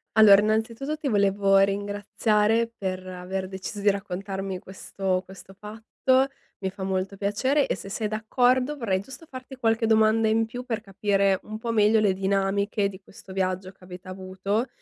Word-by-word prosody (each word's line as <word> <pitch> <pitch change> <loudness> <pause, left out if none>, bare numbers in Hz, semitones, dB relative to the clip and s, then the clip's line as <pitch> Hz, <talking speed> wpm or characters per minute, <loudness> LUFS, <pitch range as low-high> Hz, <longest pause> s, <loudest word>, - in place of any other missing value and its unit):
Allora, 205 -2 +8
innanzitutto, 225 +7 -1
ti 300 -2 -4
volevo 200 -2 +3
ringraziare 205 +3 +1
per 185 -1 -3
aver 185 +1 -4
deciso 190 +2 -6
di 205 - +4
raccontarmi 195 -1 -3
questo 190 0 -3
questo 190 0 -13
fatto. 225 +5 0 0.3
Mi 190 -1 -2
fa 190 0 -8
molto 190 +1 -2
piacere 260 +9 +1
e, - - -1
se 190 +2 -9
sei 210 +2 -2
d'accordo, 250 +6 +1
vorrei 195 -7 0
giusto 265 - -11
farti 260 -1 -10
qualche 225 -2 +1
domanda 220 0 +4
in 225 +1 +2
più 245 +2 -7
per 230 -3 -3
capire 195 -1 +1
un 215 0 -7
po' 230 +1 -3
meglio 215 0 +4
le 200 -3 +3
dinamiche 200 +1 0
di 195 0 -11
questo 190 0 -13
viaggio 185 0 -2
che 190 - -24
avete 180 0 -11
avuto 190 +5 -2
205 Hz, 165 wpm, -25 LUFS, 190-225 Hz, 0.3 s, Allora